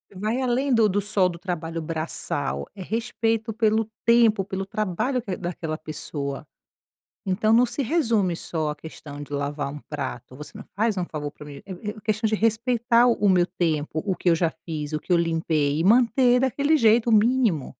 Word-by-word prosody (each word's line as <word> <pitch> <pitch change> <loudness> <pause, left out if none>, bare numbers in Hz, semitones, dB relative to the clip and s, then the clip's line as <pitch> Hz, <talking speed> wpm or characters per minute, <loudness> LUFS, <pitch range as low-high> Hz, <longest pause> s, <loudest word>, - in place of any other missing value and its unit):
Vai 215 +6 -1
além 260 +2 +1
do 225 -2 +4
do 200 +2 +1
só 195 -2 +2
do 170 - -7
trabalho 165 -2 -4
braçal. 155 - -3
É 190 - -9
respeito 225 +1 -1
pelo 220 -1 +1 0.2
tempo, 230 -4 +4
pelo 195 0 -4
trabalho 215 +6 -1
que 195 -5 -4
daquela 165 -3 -4
pessoa. 145 -3 -6 0.8
Então 210 +3 +1
não 240 +2 +6
se 240 +4 -3
resume 225 - +1
só 160 -2 -3
à - - -4
questão 145 -2 -10
de 145 - -10
lavar 145 0 -3
um 150 - -7
prato. 130 -4 -5
Você 150 +3 -10
não - - -9
faz 215 0 +1
um 180 - -1
favor 150 -3 -5
pra 150 - -13
mim, 145 -1 -10
é 195 - -8 0.2
é 215 - -10
questão 215 +1 0
de 215 - +1
respeitar 235 +2 +2
o 240 - +5
o 205 - +4
meu 180 -2 +4
tempo, 155 -3 -1
o 190 -3 -1
que - - -1
eu - - +5
já 165 0 +1 0.2
fiz, 155 -2 -4
o 155 - 0
que 180 - -4
eu - - +6
limpei 160 -3 0
e 165 - 0
manter 245 +3 +4
daquele 280 +4 +2
jeito, 230 -1 +4
mínimo. 220 - +3
195 Hz, 195 wpm, -24 LUFS, 155-230 Hz, 0.8 s, não